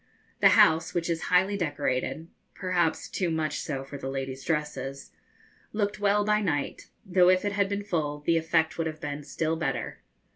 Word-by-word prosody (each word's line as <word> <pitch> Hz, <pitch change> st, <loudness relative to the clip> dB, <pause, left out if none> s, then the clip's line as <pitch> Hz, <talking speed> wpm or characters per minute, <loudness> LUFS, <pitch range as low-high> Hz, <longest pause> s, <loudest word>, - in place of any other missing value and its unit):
The -, -, +6 dB
house, 160 Hz, +2 st, +4 dB
which 170 Hz, 0 st, 0 dB
is 165 Hz, -1 st, -2 dB
highly 190 Hz, +3 st, +3 dB
decorated 145 Hz, -2 st, -2 dB, 0.3 s
perhaps 180 Hz, -4 st, 0 dB
too 180 Hz, -3 st, -1 dB
much 155 Hz, -2 st, -1 dB
so 135 Hz, -4 st, -4 dB
for 140 Hz, +1 st, -8 dB
the 135 Hz, -, -4 dB
ladies' 135 Hz, 0 st, -4 dB
dresses 150 Hz, -3 st, -3 dB, 0.6 s
looked 210 Hz, 0 st, -1 dB
well 205 Hz, 0 st, +2 dB
by 210 Hz, 0 st, +2 dB
night, 145 Hz, -8 st, -2 dB, 0.2 s
though 180 Hz, -1 st, +4 dB
if 185 Hz, +2 st, +3 dB
it 205 Hz, -, +1 dB
had 200 Hz, -1 st, +1 dB
been 200 Hz, 0 st, -2 dB
full 150 Hz, -7 st, -2 dB
the 165 Hz, +3 st, +2 dB
effect 160 Hz, 0 st, +1 dB
would 165 Hz, -, 0 dB
have 155 Hz, -1 st, -6 dB
been 145 Hz, -1 st, -4 dB
still 160 Hz, +2 st, -2 dB
better. 135 Hz, -7 st, -3 dB
165 Hz, 180 wpm, -27 LUFS, 145-185 Hz, 0.6 s, The